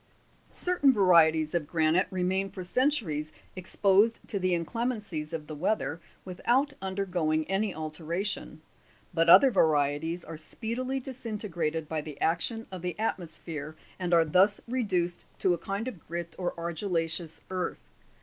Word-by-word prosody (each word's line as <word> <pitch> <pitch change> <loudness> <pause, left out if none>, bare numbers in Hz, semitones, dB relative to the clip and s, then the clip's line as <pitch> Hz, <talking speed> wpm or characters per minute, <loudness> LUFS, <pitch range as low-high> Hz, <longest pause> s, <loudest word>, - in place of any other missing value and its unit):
Certain 355 -7 +3
varieties 165 -7 +5
of 165 -4 0
granite 160 +3 +2
remain 190 +1 0
for 185 - -7
centuries 180 - 0 0.2
exposed 200 +4 +3
to 200 - -1
the 185 -1 +2
inclemencies 200 -4 -3
of 160 -2 -4
the 155 - -7
weather 170 +1 -1 0.2
without 245 +10 +1
undergoing 180 -5 0
any 195 +2 0
alteration; 160 +1 -4 0.5
but 165 0 +3
other 270 +9 +9
varieties 160 -1 +2
are 165 0 -7
speedily 245 +10 -3
disintegrated 205 - -3
by 155 0 -2
the 150 -2 -9
action 225 +8 0
of 185 -2 -6
the 180 -2 -3
atmosphere, 160 -7 -4 0.2
and 180 -1 -2
are 165 -1 +5
thus 190 +6 +4
reduced 185 -8 -1
to 185 - +2
a - - -1
kind 200 +5 -3
of 235 -9 -6
grit 170 0 -5
or 180 -1 -1
argilla'ceous 165 -1 -2
earth. 185 -1 -4
180 Hz, 140 wpm, -29 LUFS, 160-205 Hz, 0.5 s, other